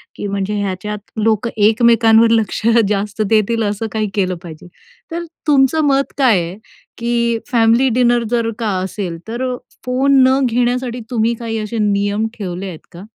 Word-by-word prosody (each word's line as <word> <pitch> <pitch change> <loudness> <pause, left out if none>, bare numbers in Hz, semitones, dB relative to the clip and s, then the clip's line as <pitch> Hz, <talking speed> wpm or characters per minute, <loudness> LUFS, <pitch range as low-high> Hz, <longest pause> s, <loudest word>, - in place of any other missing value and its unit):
की 205 - -5
म्हणजे 200 +1 -2
ह्याच्यात 205 +2 -4 0.2
लोक 220 +1 +1
एकमेकांवर 225 +1 +4
लक्ष 225 -2 +1 0.3
जास्त 205 +1 -2
देतील 225 +1 +2
असं 210 +2 -2
काही 215 -1 -1
केलं 185 -3 0
पाहिजे. 165 0 -10 0.4
तर 340 +1 -3 0.2
तुमचं 285 +1 +3
मत 275 0 +1
काय 250 -9 +4
आहे 170 +2 -5 0.4
की 235 0 0
फॅमिली 235 +2 +3
डिनर 240 -1 +3
जर 235 -1 +1
का 225 -2 -1
असेल, 185 -3 -4
तर 250 +3 -3 0.3
फोन 265 +2 +3
न 265 +1 +3
घेण्यासाठी 245 +1 -1
तुम्ही 230 -1 +1
काही 225 -1 -3
असे 215 +2 -4
नियम 205 +2 0
ठेवले 190 -2 -5
आहेत 165 -4 -9
का? 175 +2 -11
225 Hz, 155 wpm, -17 LUFS, 205-240 Hz, 0.4 s, एकमेकांवर